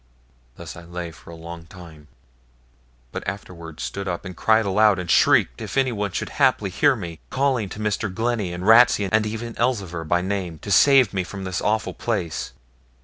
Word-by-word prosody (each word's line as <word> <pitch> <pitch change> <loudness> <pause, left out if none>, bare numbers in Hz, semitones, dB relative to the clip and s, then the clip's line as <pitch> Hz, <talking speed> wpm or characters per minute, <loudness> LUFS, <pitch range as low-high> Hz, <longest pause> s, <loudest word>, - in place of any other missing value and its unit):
Thus - - -9
I 85 - -10
lay 85 0 -7
for 85 - -16
a 85 - -9
long 85 0 -10
time, 80 -4 -13 1.0
but - - -5
afterwards 85 -4 -7
stood 100 0 -5
up 90 +1 -4
and 90 -1 -7
cried 110 +4 +3
aloud, 105 +1 +4
and 90 -2 -3
shrieked - - +4
if - - -5
anyone 115 -7 0
should - - -3
haply 125 -8 +3
hear 145 +8 +3
me, 85 -7 -7
calling 130 -7 0
to 105 - -8
Mr. 105 -1 -1
Glennie 110 -2 -1
and 90 +1 -5
Ratsey, 115 -2 +6
and 110 0 +2
even 115 +2 -5
Elzevir, 100 -9 -1
by 85 +2 +1
name, 95 -3 -3
to 100 - -5
save 130 +1 +5
me 95 -1 0
from 95 +2 -8
this 95 -2 -3
awful 110 +1 0
place. 95 -9 -3
100 Hz, 185 wpm, -23 LUFS, 85-110 Hz, 1.0 s, Ratsey